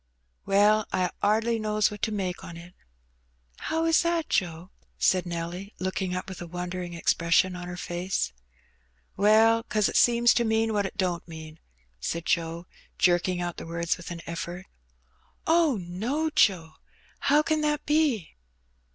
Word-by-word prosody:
"Well, 210 +2 +4
I 185 -1 0
'ardly 225 +2 +2
knows 215 -1 +1
what 210 - -8
to 220 - 0
make 190 -4 -3
on 170 - -9
it." 175 +1 -12 0.8
"How 325 +1 -1
is 330 -1 +4
that, 335 -2 0
Joe?" 175 0 -1 0.3
said 185 -1 +2
Nelly, 175 +4 -5
looking 185 0 -2
up 185 - -4
with 190 -2 -8
a 175 - -6
won 175 +1 -5
dering 180 -1 -5
expression 170 +2 +2
on 180 0 -7
her 175 0 -6
face. 175 - -2 0.8
"Well, 220 +3 +5
'cause 215 -3 0
it - - -6
seems 240 0 +5
to 240 - +2
mean 220 0 +1
what 205 -2 +1
it - - -12
don't 180 -3 -1
mean," 160 -1 -10 0.4
said 170 - -3
Joe, 170 0 -1 0.3
jerking 180 0 +2
out 175 -1 -4
the - - -7
words 170 0 -1
with 170 -1 -10
an 170 -1 -6
eflfort. 170 +2 -5 0.8
"Oh, 325 -6 +3
no, 230 - -2
Joe; 175 - +2 0.4
how 295 +2 +3
can 310 -1 0
that 300 0 0
be?" 295 - +1
185 Hz, 160 wpm, -27 LUFS, 175-225 Hz, 0.8 s, Well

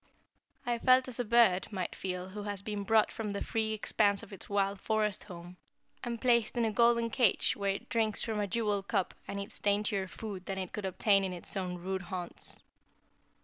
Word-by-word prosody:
I 240 -1 0
felt 255 +1 +5
as 255 -1 -7
a - - +2
bird 225 -5 +4
might 185 -4 -3
feel 180 -1 -4
who 205 +2 -6
has 205 -1 -3
been 210 -1 -3
brought 220 +1 +3
from 220 -2 -4
the 200 0 -3
free 220 -1 -1
expanse 205 -1 +2
of - - -11
its 195 - -8
wild 200 -1 0
forest 215 -2 0
home, 175 -1 -10 0.5
and 235 -1 -3
placed 235 -2 +2
in 235 - +3
a 220 - +1
golden 235 +1 +3
cage 235 -4 +3
where 200 -1 0
it - - -8
drinks 220 -2 0
from 220 -2 -2
a 205 - 0
jeweled 205 -1 -1
cup 195 -5 0
and 200 - -4
eats 200 - -6
daintier 205 -1 +1
food 195 -2 -7
than 195 - -3
it 185 -2 -4
could 210 -2 -4
obtain 195 +1 +3
in 190 -1 -2
its 175 - -3
own 180 -2 -2
rude 190 +2 -3
haunts. 180 0 -6
205 Hz, 205 wpm, -31 LUFS, 190-225 Hz, 0.5 s, felt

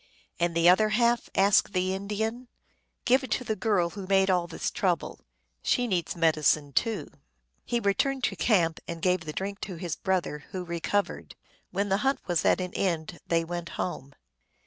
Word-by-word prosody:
" - - -35
And 170 -1 0
the 170 0 +4
other 215 +4 +6
half? 235 -1 +2
" - - -41
asked 195 +1 +4
the 185 0 +1
Indian. 220 +5 -3 0.3
" - - -47
Give 260 +2 +4
it 260 - -6
to 255 - -1
the 220 -2 -2
girl 195 -6 +1
who 195 -1 -7
made 195 0 +4
all 180 -2 +1
this 170 - -3
trouble. 185 -8 -1 0.4
She 245 - +1
needs 185 -7 -1
medicine, 155 -3 +2
too." 220 - 0 0.6
He 240 - -1
returned 255 +6 0
to - - +1
camp, 170 -8 +2
and 170 -1 -5
gave 180 -1 +1
the 155 - -4
drink 200 +5 -4
to 190 - -5
his 170 -2 -4
brother, 180 -6 -2
who 185 -1 -4
recovered. 170 +4 -2 0.3
When 200 +2 -1
the 195 - +3
hunt 270 +6 +1
was 175 -3 0
at - - +4
an 180 -1 -4
end 170 -3 -2
they 165 -1 +2
went 170 0 -5
home. 140 -6 -4
185 Hz, 190 wpm, -28 LUFS, 170-210 Hz, 0.6 s, other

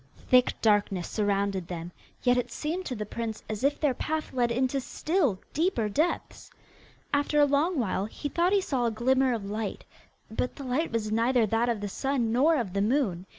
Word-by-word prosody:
Thick 250 -1 +3
darkness 205 -4 +2
surrounded 200 -3 0
them, 175 -1 -6 0.3
yet 245 -1 +4
it 245 -1 -1
seemed 340 +8 -3
to 255 - -3
the 210 -1 -4
prince 220 0 -5
as 215 +1 -4
if 285 +1 +2
their 290 -4 +2
path 310 +5 -3
led 240 -2 +1
into 260 +3 0
still 295 - 0
deeper 310 - +1
depths. 310 - -1 0.6
After 290 +1 +2
a 290 - +7
long 295 +5 +1
while 200 -5 0
he 255 +7 -5
thought 345 +5 +1
he 400 -1 +4
saw 260 -9 -1
a - - +2
glimmer 260 +4 +2
of 225 -4 -2
light, 210 +1 -4 0.5
but 250 +3 -2
the 280 - -8
light 270 +6 -1
was 220 -2 -1
neither 230 +1 +3
that 225 +3 +1
of 225 -3 -1
the 205 - -2
sun 245 +2 -1
nor 285 +8 +4
of 230 -10 -2
the 200 - 0
moon. 205 -6 0
245 Hz, 195 wpm, -28 LUFS, 210-285 Hz, 0.6 s, a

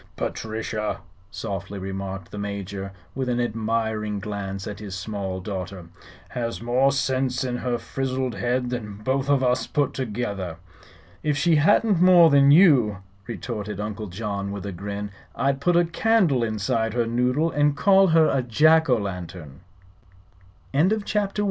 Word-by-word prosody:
"Patrichia," 110 -1 -3 0.3
softly 100 0 -5
remarked 95 -1 -5
the 105 - -6
Major, 100 -1 -5 0.2
with 130 -1 -2
an 120 0 0
admiring 110 -2 -1
glance 100 -1 -5
at 105 -2 -6
his 100 -3 -6
small 95 -1 -4
daughter, 95 -2 -6 0.4
"has 115 -1 -3
more 125 +4 +2
sinse 130 -2 0
in 125 -1 -2
her 125 -1 -1
frizzled 130 -1 -3
head 120 +5 -1
than 110 -5 -4
both 135 +3 0
of 140 -2 +3
us 125 0 +1
put 145 -3 0
together." 100 -8 -4 0.6
"If 150 -1 0
she 165 +1 +3
hadn't 200 +4 +3
more 175 -3 +7
than 140 0 +6
you," 140 - +6 0.3
retorted 105 -4 -5
Uncle 105 +1 -4
John, 100 +1 -4
with 100 -1 -6
a 100 - -4
grin, 100 +3 -5 0.2
"I'd 135 0 0
put 175 +4 +2
a 175 - +4
candle 170 - +2
inside 110 +1 -1
her 120 -1 +2
noodle 125 +7 +1
and 145 0 +2
call 195 -1 +5
her 165 -2 +5
a 135 - +1
Jack 155 +6 +4
Lantern." 90 - -3 1.1
CHAPTER 140 - +3
II. 170 - +4
THE 215 - +3
AGENT. 205 -1 -1
115 Hz, 155 wpm, -24 LUFS, 100-140 Hz, 1.1 s, more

